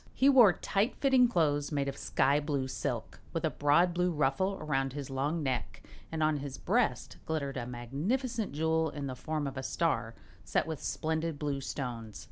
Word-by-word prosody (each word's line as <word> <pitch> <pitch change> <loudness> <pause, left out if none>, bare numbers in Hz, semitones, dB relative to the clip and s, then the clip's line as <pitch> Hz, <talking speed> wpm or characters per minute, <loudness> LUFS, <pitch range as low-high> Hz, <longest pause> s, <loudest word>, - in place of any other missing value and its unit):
He 270 - +5
wore 240 -9 +8
tight 205 +7 0
fitting 265 -3 +4
clothes 150 -9 +1
made 140 -2 0
of 140 - -3
sky 140 +2 +2
blue 145 -3 -1
silk, 130 - -4
with - - -1
a - - +1
broad 160 +5 +3
blue 180 +1 +1
ruffle 155 +6 +1
around 135 -3 -1
his 140 -2 -6
long 145 +5 -1
neck, 130 -4 -3 0.3
and 160 -1 -1
on 155 -1 +2
his 140 -1 -6
breast 230 +5 0
glittered 145 -4 -2
a 120 -1 -3
magnificent 195 - -2
jewel 160 +2 +1
in 145 -1 -5
the 130 -2 -4
form 150 +3 -3
of 135 -1 -4
a - - -2
star, 135 -6 -1 0.3
set - - 0
with 160 -3 -5
splendid 160 0 -2
blue 145 -2 -2
stones. 120 -5 -5
150 Hz, 185 wpm, -31 LUFS, 135-170 Hz, 0.3 s, wore